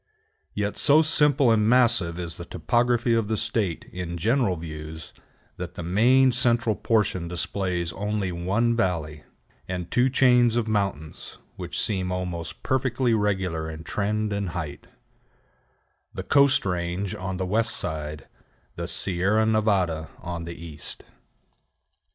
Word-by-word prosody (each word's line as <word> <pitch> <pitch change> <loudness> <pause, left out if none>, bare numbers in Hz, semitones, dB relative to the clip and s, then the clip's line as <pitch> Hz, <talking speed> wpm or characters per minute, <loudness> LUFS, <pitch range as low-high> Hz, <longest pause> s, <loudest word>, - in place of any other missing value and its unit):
Yet 105 0 -2
so 155 +2 +5
simple 150 -5 +4
and 110 -1 +3
massive 115 -9 +3
is 85 -2 -5
the 85 - -7
topography 120 +6 +1
of 115 -2 +1
the 110 0 -1
State 105 -5 -1
in 90 -1 -4
general 115 - +1
views, 80 -1 -7 0.4
that - - -6
the 90 - -6
main 125 +9 +4
central 120 -2 +2
portion 100 -6 0
displays 90 -1 -2
only 105 -2 -2
one 100 +7 0
valley, 80 -8 -2 0.4
and 90 -2 -5
two 125 +2 +3
chains 125 -3 +4
of 120 -2 0
mountains 100 -8 -3 0.2
which - - -4
seem 95 -3 0
almost 90 -2 -4
perfectly 130 -2 +1
regular 95 -7 -1
in 80 0 -8
trend 105 +3 -1
and 100 -2 -2
height: 75 -4 -6 1.3
the - - -4
Coast 140 -5 +4
Range 90 +1 -2
on 95 0 -4
the 95 - -2
west 110 +3 0
side, 75 -2 -5 0.5
the - - -4
Sierra 95 +4 +1
Nevada 100 -8 +1
on 85 -1 -5
the 85 0 -8
east. 75 -2 -8
100 Hz, 135 wpm, -25 LUFS, 85-115 Hz, 1.3 s, so